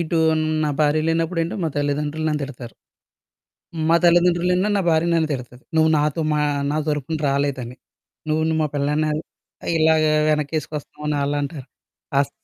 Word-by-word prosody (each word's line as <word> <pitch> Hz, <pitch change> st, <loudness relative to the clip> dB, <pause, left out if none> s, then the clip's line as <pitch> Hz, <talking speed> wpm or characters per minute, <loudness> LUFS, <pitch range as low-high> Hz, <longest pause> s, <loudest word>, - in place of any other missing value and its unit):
ఇటు 165 Hz, 0 st, 0 dB, 0.5 s
నా 150 Hz, -, 0 dB
భార్య 150 Hz, +1 st, +3 dB
లేనప్పుడు 165 Hz, +1 st, 0 dB
ఏంటి, 165 Hz, -, -3 dB
మా -, -, +1 dB
తల్లిదండ్రులు 145 Hz, +2 st, -1 dB
నన్ను 150 Hz, -1 st, -1 dB
తిడతారు. 125 Hz, -4 st, -8 dB, 1.2 s
మా 165 Hz, -, +5 dB
తల్లిదండ్రులేన్నాడు, 180 Hz, +3 st, +3 dB
నా -, -, +1 dB
భార్య 160 Hz, +1 st, +2 dB
నన్ను 160 Hz, -1 st, +2 dB
తిడతది. 125 Hz, -1 st, -7 dB
నువ్వు 160 Hz, 0 st, +4 dB
నాతో 150 Hz, +2 st, 0 dB
మా 150 Hz, -, +1 dB, 0.3 s
నా 150 Hz, -, -1 dB
తరుపున 150 Hz, +1 st, -1 dB
రాలేదని. 135 Hz, -3 st, -1 dB, 0.5 s
నువ్వు 155 Hz, +1 st, +1 dB
న్ -, -, +1 dB
మా -, -, +2 dB
పెళ్ళాని 150 Hz, +2 st, 0 dB, 0.7 s
ఇలాగా 155 Hz, -1 st, +3 dB, 0.2 s
వెనకేసుకొస్తున్నావని 150 Hz, 0 st, -2 dB
ఆళ్ళంటారు. 145 Hz, 0 st, -3 dB, 0.5 s
అస్ 140 Hz, -, 0 dB
150 Hz, 140 wpm, -22 LUFS, 145-160 Hz, 1.2 s, మా